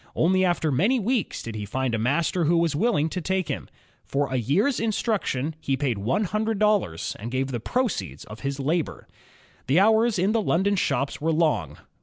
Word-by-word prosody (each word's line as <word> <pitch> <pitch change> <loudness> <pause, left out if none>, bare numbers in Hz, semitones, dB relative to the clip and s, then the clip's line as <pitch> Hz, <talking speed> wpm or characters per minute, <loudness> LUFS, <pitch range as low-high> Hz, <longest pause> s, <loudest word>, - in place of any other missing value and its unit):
Only 185 +3 +3
after 175 -4 +1
many 200 - +2
weeks 235 +2 -1
did 115 - -6
he 105 -1 -5
find 130 +4 -2
a 115 - 0
master 155 +8 +1
who 170 +3 +3
was 165 -3 +1
willing 190 -4 +2
to 180 - -4
take 190 +1 -1
him. - - -4 0.3
For 140 -1 -1
a - - +1
year's 175 - +1
instruction, 200 - -1
he 135 -1 -1
paid 130 -7 -1
one 125 - 0
hundred 215 +2 -1
dollars 195 - +1
and 110 +3 -5
gave 130 +2 -1
the 120 - -2
proceeds 220 - -2
of 110 +1 -10
his 140 0 -3
labor. 155 +4 -2 0.6
The 140 +7 +4
hours 220 +2 +4
in 190 +4 +2
the 225 0 +2
London 200 +1 +1
shops 140 -7 -1
were 165 +2 +1
long. 150 - 0
160 Hz, 195 wpm, -25 LUFS, 130-200 Hz, 0.6 s, The